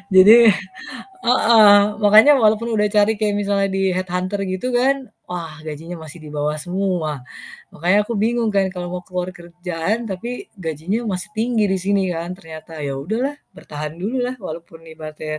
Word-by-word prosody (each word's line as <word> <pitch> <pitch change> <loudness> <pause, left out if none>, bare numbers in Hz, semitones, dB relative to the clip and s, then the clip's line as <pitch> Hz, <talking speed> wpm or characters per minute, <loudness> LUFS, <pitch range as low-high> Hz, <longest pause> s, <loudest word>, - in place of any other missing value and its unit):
Jadi 220 +4 +8 0.7
heeh, 225 -4 +6 0.3
makanya 215 +8 +7
walaupun 220 +1 +2
udah 210 -1 +2
cari 210 +1 +4
kaya 210 -1 +1
misalnya 200 -1 0
di 195 0 +1
head 185 0 -2
hunter 185 +3 -2
gitu 185 +6 -3
kan, 265 +1 +1 0.2
wah 165 -4 -6
gajinya 160 +3 -7
masih 160 +2 -10
di 150 - -9
bawah 150 +1 -1
semua. 175 -7 -2 0.5
Makanya 185 +6 +2
aku 235 - -3
bingung 230 +1 +1
kan 195 -1 +3
kalau 175 -1 -5
mau 180 0 -5
keluar 180 0 -4
kerjaan, 175 +5 -4
tapi 240 - -6
gajinya 170 +7 -3
masih 190 0 -3
tinggi 225 -1 +1
di 190 - +1
sini 195 +1 +1
kan, 170 +1 -4
ternyata. 160 -2 -11
Ya 140 -1 -3
udahlah, 240 - -2 0.2
bertahan 150 +1 -7
dululah 250 +5 -2
walaupun 165 -1 -9
ibaratnya 155 -1 -7
190 Hz, 160 wpm, -20 LUFS, 165-220 Hz, 0.7 s, Jadi